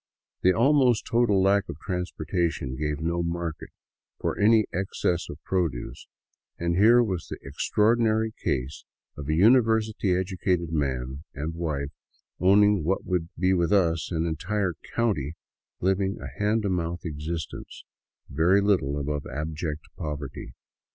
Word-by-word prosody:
The 95 - +5
almost 125 +2 +3
total 115 -5 +3
lack 100 0 +3
of - - -6
transportation 85 -6 -2
gave 75 +1 -2
no 85 +2 -1
market 85 -2 -4 0.5
for - - -1
any 110 +1 +4
excess 90 -2 -1
of - - -7
produce, 85 -10 -2 0.5
and 85 0 -1
here 115 +6 +6
was 95 -7 -3
the - - -6
extraordinary 110 +8 +1
case 65 +2 -2 0.3
of 75 0 -7
a 80 - +2
university 110 -1 +3
educated 90 -2 -1
man 65 -2 -2
and 75 +4 -3
wife 75 -4 -3 0.5
owning 100 0 +5
what 95 +5 -1
would 90 -3 -1
be 95 +2 +2
with 85 -1 +1
us 85 -5 +2
an 80 -1 0
entire 90 +4 -1 0.2
county, 85 - 0 0.5
living 95 +2 +1
a - - -6
hand 105 +1 +2
to 100 - 0
mouth 85 -1 -2
existence 80 +1 -5 0.4
very 85 +7 +3
little 95 -9 +1
above 75 0 -3
abject 75 +2 -4 0.2
poverty. 75 -3 -6
90 Hz, 135 wpm, -26 LUFS, 80-100 Hz, 0.5 s, here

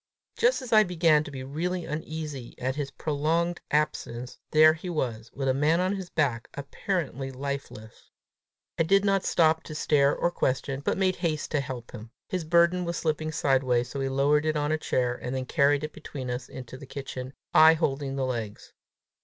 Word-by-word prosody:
Just 470 - +2
as 240 - -4
I 215 - +8
began 165 -5 +3
to - - -7
be 135 -2 -7
really 170 +6 -3
uneasy 150 -4 -5
at 130 +1 -2
his 145 -2 -3
prolonged 160 +4 -1
absence, 130 -5 -2
there 155 0 +7
he 175 +3 -7
was, 120 -9 -3
with 135 0 -3
a 130 - +3
man 150 +5 +2
on 185 +2 +1
his 190 -2 -6
back 125 -6 0
apparently 140 -1 -3
lifeless! 135 -5 -7 0.7
I - - +4
did 195 +5 +3
not 195 -1 +2
stop 160 -1 +3
to 155 - -9
stare 145 -2 +3
or 175 - 0
question, 135 -2 -1
but - - 0
made 190 -1 +1
haste 155 -4 -2
to 150 - +1
help 130 -3 -6
him. 110 +2 -9 0.2
His 180 -2 -2
burden 170 +2 +3
was 170 -1 -3
slipping 155 -1 -1
sideways, 130 -5 +1
so 140 - -5
we 135 0 -1
lowered 145 +3 +2
it 155 -1 +1
on 145 0 0
a 155 - +2
chair, 125 -4 0
and 125 +1 -5
then 130 -1 -2
carried 145 +1 +2
it 155 0 -5
between 135 -4 -6
us 125 +1 -5
into 130 0 -9
the 140 - -11
kitchen, 135 -1 -6 0.2
I 160 +1 +8
holding 140 -3 -1
the 135 -1 0
legs. 115 -5 -5
150 Hz, 195 wpm, -27 LUFS, 130-165 Hz, 0.7 s, I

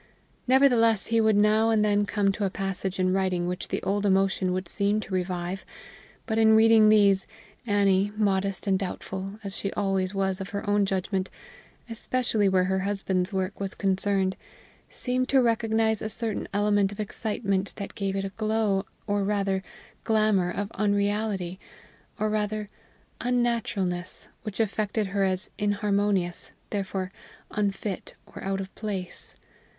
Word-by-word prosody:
Nevertheless 245 -5 +4
he 225 - +5
would 220 -1 +4
now 215 +2 +4
and 215 -1 +3
then 205 0 +2
come 200 -2 +2
to 205 +2 -3
a 195 - +2
passage 195 0 -3
in 185 0 +2
writing 185 -2 0
which 180 +1 -3
the - - -3
old 200 +1 0
emotion 190 -1 +2
would 185 0 -2
seem 205 +3 +1
to 205 -2 -7
revive; 180 0 -2 0.6
but 220 -2 0
in 220 0 +6
reading 220 -1 +6
these, 200 -3 +4 0.4
Annie, 200 -1 +3
modest 195 -2 0
and 190 -2 +2
doubtful 190 0 -5
as 195 -1 -5
she 200 - -2
always 195 -1 0
was 190 -1 0
of 190 - -5
her 200 +1 -5
own 205 -1 +3
judgment, 190 0 -1 0.6
especially 230 -3 0
where 185 -1 +3
her 190 +1 0
husband's 190 -1 -1
work 190 0 -2
was 195 -1 -3
concerned, 195 -1 +1 0.5
seemed 255 0 -2
to 270 - +5
recognize 225 -2 +2
a 215 - -3
certain 225 -1 -2
element 205 -1 +2
of 205 - -10
excitement 200 -2 -1
that 200 -2 -6
gave 195 -1 -2
it 195 0 -1
a - - -3
glow, 215 -2 0 0.2
or 205 -1 0
rather, 195 -1 0 0.4
glamour 215 -5 +2
of 205 +3 -3
unreality, 205 -3 0 0.6
or 215 - +1
rather, 210 0 -2 0.5
unnaturalness, 225 -7 -1
which 210 -2 -6
affected 215 0 0
her 200 - +1
as 190 0 -1
inharmonious, 205 -3 +1 0.2
therefore 190 -2 -3 0.4
unfit, 200 -1 -3
or - - -11
out 195 0 -1
of 195 0 -6
place. 200 -4 -5
200 Hz, 150 wpm, -27 LUFS, 190-215 Hz, 0.6 s, in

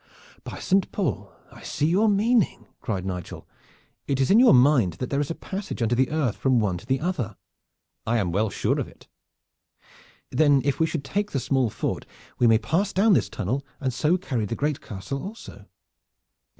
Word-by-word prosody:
"By - - -7
Saint 195 0 +1
Paul! - - -2 0.2
I - - -14
see 145 - -2
your 195 +7 +3
meaning!" 215 +1 +2
cried 100 -6 -3
Nigel. 90 -2 -6 0.6
"It 135 -1 0
is 135 - +2
in 215 - +7
your 255 - +7
mind 125 - +4
that 120 +9 -6
there 140 - +1
is 145 - -3
a 165 - -3
passage 200 +1 -6
under 115 0 +1
the 130 +1 +2
earth 150 -8 0
from 130 -3 +2
one 95 -5 0
to - - -16
the 135 0 +1
other." 140 - -3 0.7
"I 115 +1 +2
am 95 -6 0
well 105 +4 +1
sure - - 0
of - - -2
it." - - -18 1.2
"Then 145 -3 +4
if 140 - 0
we 160 - +3
should 160 -3 -3
take 205 +8 -2
the 135 - +1
small 130 -2 +1
fort - - -4 0.3
we 120 - +5
may 115 -1 +6
pass 165 - 0
down 205 +3 +4
this - - +2
tunnel, 120 +8 -2 0.2
and 130 -3 -2
so 160 +8 +2
carry 125 - -2
the 110 - -3
great 145 +1 -1
castle 105 +7 -6
also." 215 +4 -10
135 Hz, 195 wpm, -25 LUFS, 115-175 Hz, 1.2 s, in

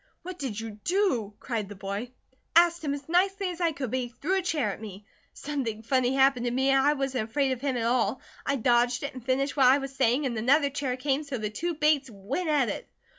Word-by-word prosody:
"What 365 0 -7
did 240 -7 -3
you 220 -2 -7
do?" 300 - 0
cried 220 -6 -3
the 205 - -8
boy. 200 +5 -4 0.5
"Asked 340 0 +5
him 285 -2 -1
as 280 -1 -10
nicely 385 +3 +1
as 350 0 -8
I 335 -1 +3
could; 275 -6 -5
but 260 - 0
he 245 -1 -4
threw 365 +10 -1
a - - -2
chair 305 - 0
at - - -11
me. 205 -2 -9 0.3
Something 255 -7 -4
funny 255 +2 +1
happened 265 -2 +3
to 240 - 0
me, 265 +2 +2
and 270 0 +4
I 290 +2 +4
wasn't 265 -5 -2
afraid 275 +2 +1
of 255 -2 -3
him 270 -3 -1
at 230 - -1
all. 245 +2 +1 0.2
I 280 - 0
dodged 245 0 +2
it, 280 - -4
and 255 -2 -9
finished 265 +2 0
what 270 -3 +5
I 260 +2 +6
was 275 -1 -5
saying, 260 +2 +2
and 245 -3 -1
another 280 +6 +3
chair 270 -3 -2
came, 275 +2 0
so 280 -3 -5
the 215 -2 -3
two 340 +10 -3
Bates 295 -3 +2
went 215 - -4
at 290 -5 +3
it." - - -5
265 Hz, 245 wpm, -27 LUFS, 235-290 Hz, 0.5 s, I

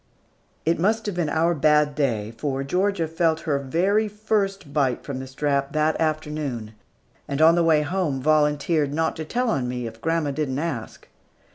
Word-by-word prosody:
It 165 +1 +1
must 220 +5 +1
have 205 - -2
been 175 -3 -1
our 165 +3 +2
bad 150 -1 +3
day, 115 -8 -1
for 135 +2 -2
Georgia 180 +3 0
felt 165 0 +1
her 145 -3 0
very 185 +11 +1
first 200 -6 -2
bite 135 -5 +1
from 135 -2 -5
the 130 - -6
strap 140 0 -1
that 155 +1 +1
afternoon, 150 -8 -2 0.5
and 140 - -3
on 160 +1 +7
the 170 0 +3
way 155 -2 +4
home 160 -4 -1
volunteered 150 +1 +2
not 160 +2 0
to 160 - -4
tell 245 +7 0
on 130 -3 -1
me, 125 -1 -3
if 115 0 -8
grandma 165 -3 0
did 150 0 -2
not 135 +4 -2
ask. 135 -10 -5
155 Hz, 180 wpm, -24 LUFS, 140-170 Hz, 0.5 s, on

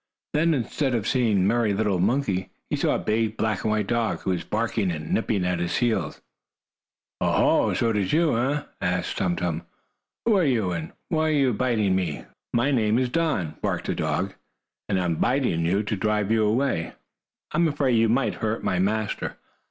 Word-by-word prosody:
Then, 160 +2 +3
instead 130 +1 -1
of 110 -3 -1
seeing 120 -5 +2
the 95 - +3
merry 110 -2 +2
little 100 -3 +1
monkey, 100 -2 0 0.2
he - - +2
saw - - +1
a - - +1
big 110 0 -1
black 110 -3 -1
and - - 0
white 105 -1 +1
dog, 115 +1 -1
who 95 - -1
was 90 -2 -1
barking 110 -2 -1
and 75 -3 -3
nipping 105 -5 0
at 90 -1 0
his 85 0 -1
heels. 120 -2 0 1.0
"Oh, - - +2 0.4
ho! - - 0
So 115 -1 +1
it 105 - 0
is 95 -2 0
you, 160 -4 +3
eh?" 140 +5 0 0.2
asked 90 -1 -1
Tum 90 -2 +1
Tum. 85 -2 -2 0.6
"Who 225 -2 +4
are 185 - +3
you, 115 - +1
and 80 -2 -4 0.2
what 160 -3 +1
are - - +2
you 135 -4 +3
biting 110 -4 +1
me 90 -6 -1
for?" - - -22 0.2
"My 120 +4 +2
name 110 -4 +2
is 125 -1 +1
Don," 130 - -1
barked - - -1
the - - -1
dog, - - -1 0.6
"and 95 -2 +1
I 90 - 0
am 85 -2 0
biting 125 - +1
you 100 +4 +1
to 105 +1 -2
drive 105 0 0
you 110 -1 +3
away. 115 -6 0 0.6
I - - -2
am 170 - +4
afraid 145 -3 +1
you 115 -1 +3
might 130 +4 +2
hurt 110 +1 -1
my 90 - 0
master. 105 +3 -1
110 Hz, 205 wpm, -25 LUFS, 95-125 Hz, 1.0 s, Who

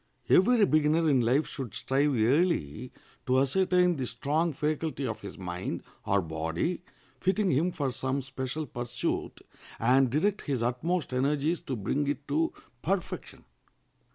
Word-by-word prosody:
Every 220 +3 +5
beginner 155 0 +3
in 135 -4 +4
life 125 +6 +2
should 130 -7 -6
strive 140 +1 +1
early 125 - +1 0.4
to 130 0 +3
ascertain 180 +4 +3
the 130 -2 -2
strong 150 +8 0
faculty 150 0 -2
of - - -4
his 100 - -8
mind 90 -1 -4 0.2
or 100 -1 +2
body 80 - -2 0.4
fitting 195 +1 +1
him 160 +7 +2
for 140 -5 -2
some 130 +2 -2
special 130 +3 -4
pursuit, 120 -2 -3 0.4
and 130 +3 +4
direct 190 - +1
his 135 -6 -2
utmost 135 +6 -1
energies 145 +5 +1
to 130 - -4
bring 140 +7 -1
it 140 0 -3
to 325 +1 +1 0.3
perfection. - - -3
140 Hz, 140 wpm, -29 LUFS, 125-160 Hz, 0.4 s, Every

